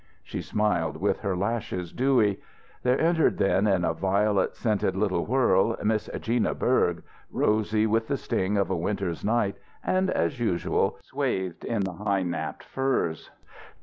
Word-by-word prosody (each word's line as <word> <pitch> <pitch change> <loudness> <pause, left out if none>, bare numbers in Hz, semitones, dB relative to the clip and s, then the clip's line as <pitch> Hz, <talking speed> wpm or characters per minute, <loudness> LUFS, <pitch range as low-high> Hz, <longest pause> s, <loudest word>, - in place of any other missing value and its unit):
She - - -5
smiled 105 -6 0
with - - 0
her 95 -2 -1
lashes 100 -4 -2
dewy. 120 -7 +2 0.4
There 125 +1 +2
entered 165 0 +3
then, 100 +1 +2
in 95 -3 +2
a 80 - +1
violet 100 +3 +1
scented 105 -4 0
little 95 -4 0
whirl, 115 -3 +3
Miss 110 0 0
Gina 115 0 0
Berg, 90 -9 +1 0.3
rosy 110 0 +1
with 115 +1 +1
the 140 - 0
sting 100 -3 -1
of 100 -1 +1
a - - +1
winter's 90 -1 -2
night, 105 -2 +1 0.3
and, 185 0 +1
as 135 - 0
usual, 100 -7 0
swathed 95 -2 -2
in 115 -3 -1
the 95 -1 -3
high 100 0 0
napped 85 -1 -4
furs. 135 -12 -1
105 Hz, 150 wpm, -26 LUFS, 95-115 Hz, 0.4 s, entered